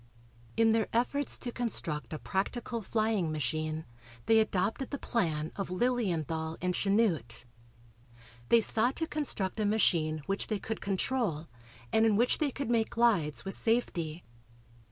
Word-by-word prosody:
In 225 0 +4
their 220 -1 +2
efforts 255 +5 +1
to 240 - -4
construct 195 -11 -1
a 155 - -3
practical 230 +7 -3
flying 215 -5 0
machine 155 +2 -2 0.4
they 225 0 +5
adopted 220 +4 0
the 285 - -3
plan 160 - -1
of 195 -3 -3
Lilienthal 170 - -1
and 180 0 -1
Chanute. 190 - +1 1.0
They 235 - +6
sought 230 +4 +5
to 325 - -1
construct 260 - -2
a 215 - +1
machine 160 -8 +1
which 195 +1 -1
they 215 - -1
could 220 +2 -5
control 195 - -1 0.4
and 220 - +4
in 220 -2 +4
which 240 +4 +2
they 300 - +1
could 270 -2 -4
make 225 -2 +2
glides 180 - +1
with 195 - -1
safety. 175 -8 0
205 Hz, 145 wpm, -30 LUFS, 160-230 Hz, 1.0 s, They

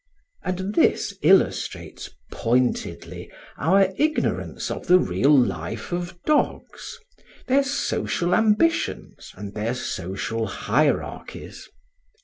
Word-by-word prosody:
And 185 +2 -3
this 200 - +2
illustrates 190 +5 +1 0.2
pointedly 125 +2 -1 0.3
our 190 +5 +3
ignorance 310 +1 -1
of - - -6
the 180 - +7
real 140 - +3
life 100 - -1
of 175 0 -4
dogs, 305 -1 -1 0.5
their 270 +2 +3
social 180 -9 -1
ambitions 220 - +1
and 100 -1 -8
their 110 +4 -2
social 110 +2 -3
hierarchies. 135 +9 -2
160 Hz, 95 wpm, -24 LUFS, -, 0.5 s, the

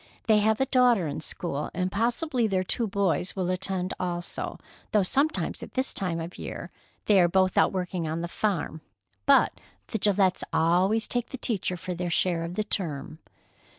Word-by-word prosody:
They 215 -2 +5
have 215 +1 +2
a 265 - +3
daughter 245 -8 +4
in 150 - -4
school, 150 -2 -4
and 185 +1 -1
possibly 240 +4 0
their 190 -2 +1
two 230 +5 -1
boys 195 -2 0
will 185 -2 0
attend 185 0 -1
also, 175 -1 -3 0.4
though 210 -2 +5
sometimes 280 +11 0
at - - -10
this 260 0 0
time 180 -4 -2
of 165 +2 -7
year - - -6 0.3
they 200 -3 +5
are 175 - +5
both 185 +1 +2
out - - +4
working 180 -3 -2
on 160 +2 -2
the 170 - -2
farm. 170 -4 -2 0.5
But - - +4 0.3
the 220 - -2
Gillettes 195 -2 +2
always 185 +7 +2
take 245 -1 -2
the 265 - -6
teacher 195 -7 -1
for 180 +2 -5
their 175 0 -3
share 170 0 +1
of 170 +1 -5
the 215 - 0
term." 155 -7 -3
185 Hz, 185 wpm, -27 LUFS, 175-215 Hz, 0.5 s, They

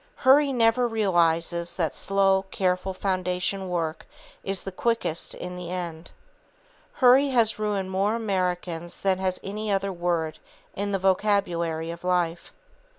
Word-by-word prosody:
Hurry 280 +2 +5
never 240 0 +3
realizes 170 -5 +1
that 165 -5 -1
slow, 195 0 +2
careful 185 0 0
foundation 185 0 -2
work 165 -2 -3 0.4
is 195 -1 -2
the 195 - -5
quickest 210 -5 -1
in 180 0 -6
the 180 -1 -7
end. 175 -2 -5 0.8
Hurry 260 +1 +5
has 230 -5 +2
ruined 200 -3 -1
more 200 +3 +1
Americans 180 -5 -2
than 190 -1 +1
has 185 -1 -1
any 210 +2 -4
other 195 0 0
word 170 -3 -2 0.4
in 200 +1 -2
the 195 - +1
vocabulary 180 -4 0
of 170 +1 -10
life. 175 -2 -1
185 Hz, 135 wpm, -25 LUFS, 175-205 Hz, 0.8 s, Hurry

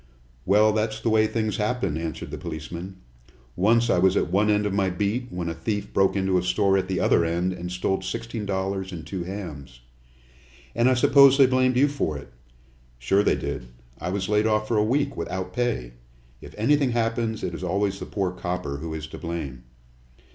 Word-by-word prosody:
"Well, 105 +2 +5
that's 110 0 -1
the 115 0 0
way 110 0 +4
things 110 -1 -1
happen," 105 -6 -1
answered 80 0 -5
the - - -5
policeman. 85 +3 -6 0.6
"Once 115 +5 +3
I 105 - +3
was 95 +1 +4
at 85 - 0
one 105 +3 +3
end 105 0 +2
of 100 - -1
my 100 -1 +1
beat 105 +7 -1
when 90 -4 -4
a 85 - -2
thief 105 +5 -4
broke 95 0 +3
into 95 -1 +2
a - - -1
store 95 +2 +2
at 95 -1 0
the 95 0 -1
other - - +3
end 85 +3 0
and 90 0 -6
stole 95 +1 -1
sixteen 110 +3 -5
dollars 95 0 -2
and 80 -4 -7
two 90 +2 -5
hams." 75 -11 -8 0.9
"And 120 +3 +3
I 130 - +3
suppose 135 +2 +6
they 135 - +7
blamed 130 0 +2
you 140 +3 +5
for 135 - -2
it." 70 -4 -12 0.6
"Sure - - +2
they - - +2
did. - - -5 0.3
I 90 - -3
was 95 0 -2
laid 105 +1 +2
off 110 0 +1
for 115 - +1
a 105 - +4
week, 140 +5 0
without 90 +2 -4
pay. 120 - -1 0.5
If - - -12
anything 135 +3 +2
happens 115 -1 -1
it 85 - -2
is 85 - -6
always 100 +2 0
the - - -6
poor 95 -3 -1
copper 90 -5 -4
who 80 +2 -5
is 75 -1 -5
to 80 - -10
blame." 70 -8 -5
95 Hz, 205 wpm, -25 LUFS, 90-110 Hz, 0.9 s, they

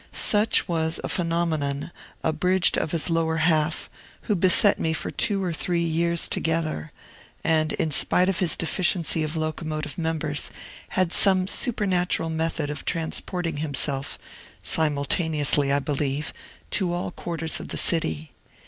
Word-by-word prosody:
Such 210 +1 +2
was 160 -2 0
a - - -2
phenomenon 165 -4 -1 0.3
abridged 180 +4 +2
of - - -1
his 165 +1 +1
lower 165 -1 +1
half, 155 -1 +1 0.3
who 210 - -1
beset 185 +3 +4
me 160 - 0
for 160 - -4
two 200 -2 +1
or 175 -2 -2
three 170 +1 0
years 170 +1 +1
together, 160 - -1 0.5
and, 155 -1 +1
in 160 - -1
spite 180 +5 +4
of 190 -2 0
his 180 -4 +2
deficiency 170 -1 0
of 155 +1 -3
locomotive 155 -1 -4
members, 160 -3 -2 0.5
had 185 -2 +2
some 185 -2 +4
supernatural 185 -7 +1
method 160 -2 -2
of 150 - -6
transporting 165 0 -2
himself 140 -2 -2 0.5
(simultaneously, 150 -1 +1
I 140 - +4
believe) 145 +1 -2 0.4
to 185 -3 +1
all 175 0 -3
quarters 165 -2 -2
of - - -7
the - - -1
city. 80 - -1
160 Hz, 140 wpm, -24 LUFS, 155-175 Hz, 0.5 s, beset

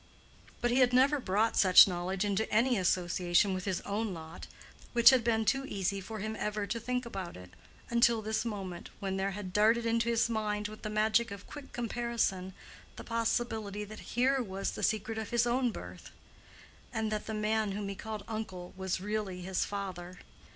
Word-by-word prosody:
But 240 - +1
he 250 - +3
had 250 -1 +4
never 275 +3 +4
brought 215 0 +1
such 185 0 +8
knowledge 185 +2 -2
into 205 +2 -1
any 245 +4 +3
association 180 0 +2
with 185 0 -4
his 190 -3 -1
own 205 -1 -2
lot, 160 0 -9 0.5
which 235 +1 +8
had 255 -3 +3
been 225 -1 +1
too 270 +6 +2
easy 195 -2 -2
for 220 +4 -7
him 215 +2 -4
ever 210 -1 -2
to 230 +3 -3
think 250 +2 -2
about 190 -6 -6
it—until 225 - -1
this 220 +1 -1
moment 195 -6 -5
when 195 -1 -2
there 190 +1 0
had 185 -3 -6
darted 225 +3 +4
into 230 0 +1
his 235 0 +2
mind 210 -2 -1
with 215 - -11
the 215 - -4
magic 220 +2 +2
of 200 -1 -8
quick 290 -2 -10
comparison, 230 -6 -2 0.4
the - - -8
possibility 225 -3 -1
that 215 +1 -9 0.2
here 265 +2 +3
was 195 -3 -3
the - - -7
secret 220 +1 0
of 220 - -5
his 235 0 +2
own 245 +1 +2
birth, 90 - -9 0.8
and 220 -1 -2
that 215 -1 -3
the 220 - -3
man 215 -1 0
whom 205 0 -4
he 200 - -3
called 215 +1 -6
uncle 205 -5 -6
was 190 0 -2
really 205 -3 -3
his 185 +1 -1
father. 185 -3 -6
215 Hz, 185 wpm, -31 LUFS, 190-230 Hz, 0.8 s, such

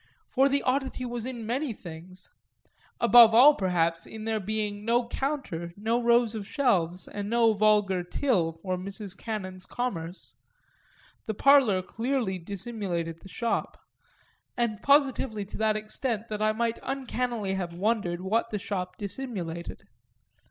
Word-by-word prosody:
For 270 +2 +4
the 280 0 +1
oddity 260 -1 -1
was 240 -1 -4
in 240 -4 -6
many 255 +3 -1
things 180 0 -11 0.7
above 235 -1 +8
all 275 +6 +9
perhaps 170 - 0
in 220 -1 -8
there 220 -1 0
being 210 0 -3
no 235 +2 +1
counter, 240 - -3
no 225 +4 0
rows 235 -1 +3
of 210 -3 -5
shelves 180 - +1
and 205 0 -5
no 230 -1 +4
vulgar 205 -3 +3
till 180 - 0
for 180 +3 -4
Mrs. 195 +1 -5
Cannon's 185 -4 -5
commerce; 180 -8 -4 0.9
the 220 - -2
parlour 255 -8 +5
clearly 230 -3 -2
dissimulated 180 -3 -4
the 190 - -13
shop 235 +4 -2 0.8
and 230 -4 -1
positively 265 -7 +2
to 195 - -9
that 215 -1 +2
extent 220 +1 -3
that 210 -1 -4
I 215 0 +3
might 230 +1 -1
uncannily 245 -6 -2
have 175 -3 -3
wondered 185 -3 0
what 220 +5 0
the 210 - -2
shop 185 -2 -4
dissimulated. 195 -6 -5
215 Hz, 140 wpm, -27 LUFS, 185-240 Hz, 0.9 s, all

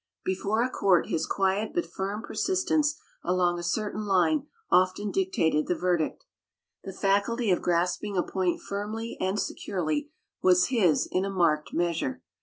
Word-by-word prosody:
Before 200 +4 0
a 255 - 0
court, 190 -3 +2
his 160 - -1
quiet 195 - 0
but 345 - +1
firm 200 +3 -4
persistence 310 -5 0 0.2
along 175 -1 +1
a - - -6
certain 210 +4 -2
line 265 - +2 0.2
often 185 +3 +3
dictated 260 - +1
the 180 - +1
verdict. 175 -4 -1 0.6
The 195 - -6
faculty 200 +4 +1
of 180 - +2
grasping 180 +3 0
a 180 - +3
point 185 -2 -1
firmly 215 +3 -4
and 190 +2 0
securely 200 - -2 0.3
was 180 +2 +4
his 205 - +3
in 185 - +1
a 195 - -2
marked 165 -5 +1
measure. 170 -6 -1
195 Hz, 150 wpm, -27 LUFS, 180-220 Hz, 0.6 s, was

